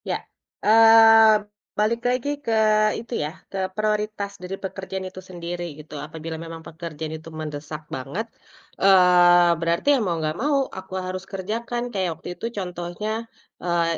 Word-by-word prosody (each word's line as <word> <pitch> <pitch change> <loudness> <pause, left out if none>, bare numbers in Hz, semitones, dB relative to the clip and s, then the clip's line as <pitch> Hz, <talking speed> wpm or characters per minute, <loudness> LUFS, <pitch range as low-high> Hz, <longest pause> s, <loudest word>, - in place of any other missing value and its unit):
Ya. - - -3 0.4
Eee, 225 0 +8 0.4
balik 220 +3 +1
lagi 250 +3 0 0.2
ke 230 - -1 0.5
itu 235 +2 -9
ya, 150 - -4 0.2
ke 195 - -5 0.2
prioritas 210 -1 -1
dari 185 +1 -5
pekerjaan 190 0 -5
itu 185 0 -10
sendiri 175 -1 -5 0.2
gitu, 155 0 -12
apabila 160 +1 -7
memang 165 0 -8
pekerjaan 160 -1 -6
itu 160 +1 -12
mendesak 150 0 -6
banget, 140 - -4 0.6
eee, 180 -2 +6
berarti 170 +8 0
ya - - +1
mau 170 -3 0
nggak 155 +1 -2
mau 290 +1 +2 0.2
aku 190 0 -9
harus 185 0 -4
kerjakan, 230 +5 -3
kayak 190 -3 0
waktu - - -11
itu - - -6
contohnya, 180 +2 -4 0.5
eee, 170 -1 +1
185 Hz, 145 wpm, -23 LUFS, 165-215 Hz, 0.6 s, Eee